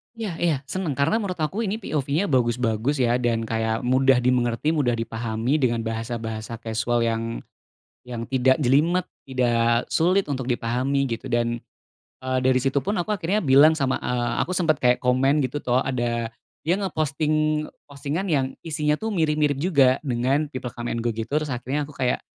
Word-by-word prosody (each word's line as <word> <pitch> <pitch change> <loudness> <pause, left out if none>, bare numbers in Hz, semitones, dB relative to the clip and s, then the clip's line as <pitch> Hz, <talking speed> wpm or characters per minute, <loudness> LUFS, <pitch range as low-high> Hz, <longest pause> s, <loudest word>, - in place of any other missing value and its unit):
Iya 220 -4 -4
iya, 170 -3 +2
seneng. 180 -8 -2
Karena 140 +11 +2
menurut 195 -4 -3
aku 195 +9 -1
ini 200 - -1
POV-nya 155 +3 -1
bagus-bagus, 120 0 +1
ya. 120 +1 +2
Dan 115 -2 0
kayak 110 0 -1
mudah 130 +1 +4
dimengerti, 125 +3 +1
mudah 140 -7 +1
dipahami 115 +4 -1
dengan 120 -3 +1
bahasa-bahasa 115 0 -4
kasual 115 +1 0
yang 115 0 -2 0.6
yang 120 -2 -5
tidak 130 0 +3
jelimet, 155 +8 +3 0.2
tidak 120 -2 +2
sulit 185 +4 +3
untuk 130 -2 -3
dipahami, 125 +4 0
gitu. 115 - -4
Dan, 120 0 0 0.6
eee, 130 0 0
dari 130 0 +3
situ 135 +1 +1
pun 205 +2 -1
aku 175 - -4
akhirnya 195 +2 0
bilang 145 +2 +6
sama, 135 -4 0
eee, 120 -1 -1
aku 185 - -3
sempet 160 -5 +2
kayak 125 0 +3
komen 135 +3 +3
gitu 130 +3 -2
tuh, 125 +1 +2
ada 120 -3 -2 0.3
dia 175 +5 +1
nge-posting 155 -3 0 0.2
postingan 145 +6 -3
yang 140 -4 +2 0.2
isinya 150 -2 0
tuh 220 +8 -3
mirip-mirip 150 -6 +1
juga 140 -5 +3
dengan 130 +5 +1
people 130 -4 -6
come 120 0 -4
and 115 - -2
go 120 - 0
gitu, 110 0 -4
terus 150 -1 0
akhirnya 130 +4 -2
aku 145 - -7
kayak 130 -3 -1
130 Hz, 170 wpm, -24 LUFS, 120-155 Hz, 0.6 s, bilang